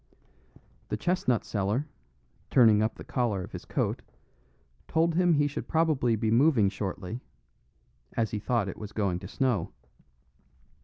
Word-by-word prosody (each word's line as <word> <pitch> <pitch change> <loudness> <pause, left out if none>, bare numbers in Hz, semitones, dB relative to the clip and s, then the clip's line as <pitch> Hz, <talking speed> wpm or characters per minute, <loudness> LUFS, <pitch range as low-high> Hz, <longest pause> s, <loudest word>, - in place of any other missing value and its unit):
The - - -1
chestnut 175 -10 0
seller, 105 +8 -1 0.6
turning 110 -5 +6
up 110 +1 0
the - - -9
collar 115 -7 -1
of - - -10
his - - -8
coat, - - -1 0.9
told 165 +1 +2
him 175 0 +3
he 145 -1 +3
should 145 - -4
probably 155 -8 +2
be 110 0 0
moving 120 -4 +4
shortly, 100 +2 -5 1.0
as 115 -2 +1
he 105 - -2
thought 115 -1 0
it 95 - -6
was 105 -1 -8
going 95 -5 0
to 95 - -8
snow. 120 -5 -1
115 Hz, 145 wpm, -28 LUFS, 100-145 Hz, 1.0 s, turning